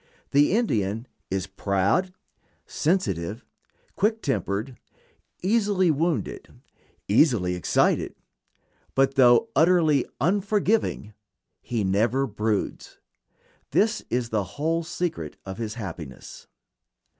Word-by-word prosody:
The 145 Hz, +5 st, +4 dB
Indian 115 Hz, -, 0 dB, 0.2 s
is 95 Hz, -1 st, -1 dB
proud, 100 Hz, -, 0 dB, 0.5 s
sensitive, 110 Hz, -, -1 dB, 0.5 s
quick 220 Hz, +2 st, +1 dB
tempered, 120 Hz, -2 st, -2 dB, 0.7 s
easily 200 Hz, -3 st, +2 dB
wounded, 160 Hz, +2 st, -2 dB, 0.6 s
easily 105 Hz, -, +3 dB
excited; 90 Hz, -2 st, +1 dB, 0.8 s
but 135 Hz, 0 st, +3 dB
though 130 Hz, -, +5 dB
utterly 160 Hz, -5 st, +4 dB
unforgiving, 200 Hz, -, +1 dB, 0.5 s
he 115 Hz, -3 st, -2 dB
never 110 Hz, +8 st, +1 dB
broods. 105 Hz, -3 st, -3 dB, 0.7 s
This 215 Hz, +1 st, +1 dB
is 120 Hz, -1 st, -1 dB
the 110 Hz, -3 st, 0 dB
whole 165 Hz, +3 st, 0 dB
secret 170 Hz, 0 st, -4 dB
of 95 Hz, +2 st, -7 dB
his 110 Hz, -1 st, -4 dB
happiness. 85 Hz, -, -8 dB
130 Hz, 90 wpm, -25 LUFS, -, 0.8 s, though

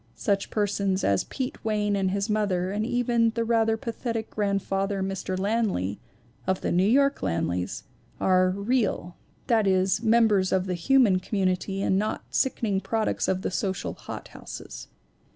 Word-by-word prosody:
Such 200 Hz, -1 st, 0 dB
persons 200 Hz, -2 st, 0 dB
as 100 Hz, -1 st, +2 dB
Pete 260 Hz, -1 st, -5 dB
Wayne 210 Hz, -2 st, 0 dB
and 195 Hz, -1 st, +1 dB
his 200 Hz, +2 st, -1 dB
mother, 195 Hz, -4 st, 0 dB
and 210 Hz, +2 st, -1 dB
even 240 Hz, -2 st, +2 dB
the 230 Hz, -, +1 dB
rather 225 Hz, -1 st, +2 dB
pathetic 230 Hz, 0 st, -4 dB
grandfather 195 Hz, -1 st, -1 dB
Mr. 190 Hz, -1 st, -3 dB
Lanley 195 Hz, -, 0 dB, 0.5 s
(of 190 Hz, 0 st, 0 dB
the -, -, -1 dB
New 180 Hz, +3 st, +3 dB
York 275 Hz, +3 st, +3 dB
Lanleys) 90 Hz, +2 st, -2 dB, 0.4 s
are 185 Hz, 0 st, +3 dB
"real," 200 Hz, -3 st, -1 dB, 0.3 s
that 220 Hz, -4 st, +2 dB
is, 190 Hz, 0 st, +2 dB
members 220 Hz, -4 st, +3 dB
of 190 Hz, -1 st, +2 dB
the 185 Hz, -, -2 dB
human 200 Hz, +2 st, +4 dB
community 190 Hz, 0 st, -1 dB
and 190 Hz, -, +2 dB
not 215 Hz, +1 st, -2 dB
sickening 215 Hz, -7 st, 0 dB
products 220 Hz, 0 st, -1 dB
of 185 Hz, 0 st, 0 dB
the -, -, -1 dB
social 190 Hz, 0 st, -2 dB
hothouses. -, -, -9 dB
200 Hz, 150 wpm, -26 LUFS, 185-225 Hz, 0.5 s, human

